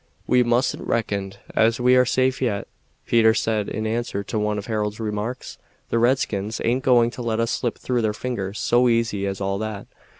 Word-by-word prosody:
"We 125 - +4
mustn't 120 +2 0
reckon 100 -4 -1 0.2
as 115 +2 +3
we 125 +1 +4
are 125 0 +5
safe 130 +1 +1
yet," 105 -6 -1 0.4
Peter 110 -1 +4
said 110 -2 0
in 110 +1 -3
answer 110 -2 -2
to 105 +2 -3
one 105 0 0
of 100 - -5
Harold's 105 -1 -2
remarks. 110 +3 -4 0.3
"The 115 - +1
redskins 115 -4 0
aint 125 +3 +1
going 120 -2 +4
to 125 - -8
let 115 -2 -1
us 115 0 0
slip 120 -1 -2
through 125 -2 -1
their 110 -1 +1
fingers 105 -4 -4
so 120 +6 +3
easy 110 -4 0
as 95 -1 -4
all 100 0 -1
that. 110 -2 -5
115 Hz, 195 wpm, -23 LUFS, 105-120 Hz, 0.4 s, are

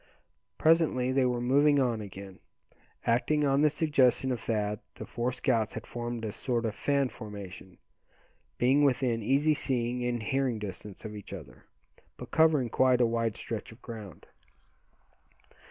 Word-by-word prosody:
Presently 155 -6 +3
they 130 0 +3
were 125 -1 0
moving 140 +4 +4
on 120 -4 +1
again. 100 -2 -9 0.7
Acting 145 +6 +2
on 140 0 +3
the 150 - +5
suggestion 135 -4 +2
of 125 - -2
Thad 105 -2 -1 0.2
the - - -7
four 120 +2 -2
scouts 120 -4 0
had - - -6
formed 120 -1 -5
a 105 - -3
sort 120 +1 -2
of 110 - -1
fan 140 -2 +1
formation, 100 -5 -9 0.8
being 135 +4 +4
within 125 -4 +2
easy 140 +7 +3
seeing 125 -3 -1
and 120 -2 -1
hearing 130 0 0
distance 105 0 -8
of 105 0 -6
each 100 -1 -9
other, 70 -10 -11 0.5
but - - -9
covering 155 -6 +4
quite 130 +1 +3
a 120 - +5
wide 115 -2 -1
stretch 115 -1 -5
of 110 - -15
ground. 105 -8 -9
120 Hz, 155 wpm, -29 LUFS, 110-135 Hz, 0.8 s, the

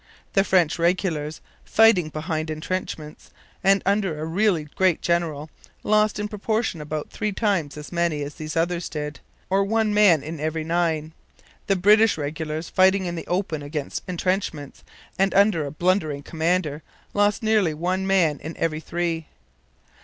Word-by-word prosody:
The 195 - +4
French 175 -4 +2
regulars, 165 -3 0 0.2
fighting 220 -8 +4
behind 155 0 -3
entrenchments 155 -1 -5 0.3
and 195 0 +4
under 195 -6 +1
a 155 - -3
really 175 0 +1
great 185 -3 +3
general; 160 -3 -1 0.3
lost 215 0 +2
in 210 0 -2
proportion 215 -4 -2
about 150 0 -5
three 210 - -2
times 190 -8 -1
as 150 - -9
many 170 -4 0
as 145 +1 -6
these 155 +2 -6
others 170 +1 0
did, 150 -1 -5 0.3
or 195 +1 +2
one 220 +1 +1
man 200 -8 +5
in 160 +1 -6
every 155 +1 -2
nine. 160 -2 -1 0.5
The 195 - +3
British 210 +3 +5
regulars, 155 +2 -4
fighting 190 +1 +3
in 175 - -3
the 165 - -6
open 175 -4 -1
against 145 0 -4
entrenchments 180 -5 -2 0.4
and 195 0 +2
under 195 -7 +4
a - - -6
blundering 155 -4 0
commander, 160 -1 -1 0.3
lost 205 +2 +2
nearly 210 -8 +2
one 185 +4 -1
man 175 -6 +2
in 160 +2 -7
every 155 -2 -1
three. 165 -1 -3
170 Hz, 155 wpm, -24 LUFS, 155-195 Hz, 0.5 s, man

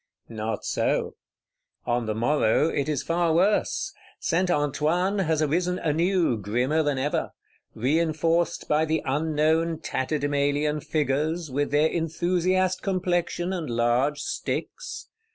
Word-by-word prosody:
Not 110 -1 -4
so: - - 0 0.7
on 120 -1 0
the 110 - -1
morrow 120 +4 +2
it 140 -1 -1
is 145 -3 -1
far 170 -1 +1
worse. 215 - +1 0.3
Saint 180 +2 0
Antoine 165 +6 +1
has 160 -4 +1
arisen 175 +4 0
anew, 165 -3 +1
grimmer 125 +10 +1
than 145 -3 0
ever;—reinforced 160 +4 -1
by 150 +1 +2
the 160 0 0
unknown 160 +3 +1
Tatterdemalion 145 +2 -1
Figures, 155 +1 -1
with 145 +2 0
their 150 +2 +3
enthusiast 180 +3 0
complexion 180 -1 -1
and 170 -7 -4
large 120 +5 +1
sticks. 485 - -4
155 Hz, 115 wpm, -25 LUFS, 145-175 Hz, 0.7 s, their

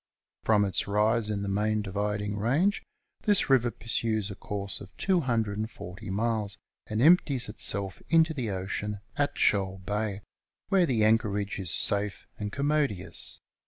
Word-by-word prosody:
From 105 -2 +3
its 95 0 0
rise 105 +2 +2
in 100 -1 -2
the - - -3
Main 105 +2 0
Dividing 105 +1 -2
Range 140 - +1 0.4
this 205 -9 +3
river 125 -3 +5
pursues 110 -2 -2
a - - -6
course 100 -1 -5
of 100 -1 -12
240 110 - -1
miles, 105 0 -1 0.3
and 110 +3 0
empties 150 -6 +4
itself 100 -2 0
into 165 -1 +4
the 125 -7 -3
ocean 100 +2 -3
at 145 0 0
Shoal 95 -2 +2
Bay, 105 +1 -3 0.5
where 185 -3 +4
the 115 -5 +2
anchorage 105 -2 +1
is 95 -3 -2
safe 100 0 0
and 105 -1 -3
commodious. 140 - -1
105 Hz, 140 wpm, -28 LUFS, 100-120 Hz, 0.5 s, river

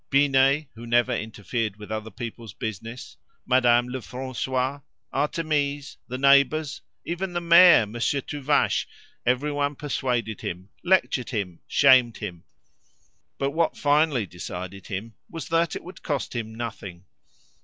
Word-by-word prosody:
Binet, 140 +1 +3
who 115 +1 -10
never 120 +2 +3
interfered 110 -1 -3
with 105 0 -10
other 110 0 -4
people's 115 -1 -8
business, 115 +3 -6 0.3
Madame 120 -1 +4
Lefrancois, 130 +2 -3 0.3
Artémise, 145 -1 -1
the 125 - -4
neighbours, 140 +3 +3 0.2
even 175 +2 -3
the 175 - 0
mayor, 170 -6 +7
Monsieur 120 +6 -1
Tuvache 145 +1 0 0.4
everyone 145 +3 +1
persuaded 125 -6 -2
him, 90 +3 -6
lectured 180 -8 +2
him, 100 -8 -3
shamed 130 -4 +5
him; 90 -5 -7 0.9
but 140 0 -1
what 165 +2 0
finally 145 -5 +2
decided 90 +1 -7
him 105 +4 -5 0.2
was 165 -4 -7
that 165 0 +1
it - - -6
would 180 +2 -11
cost 145 -4 -3
him 110 -1 -4
nothing. 100 -6 -7
130 Hz, 125 wpm, -25 LUFS, 110-145 Hz, 0.9 s, mayor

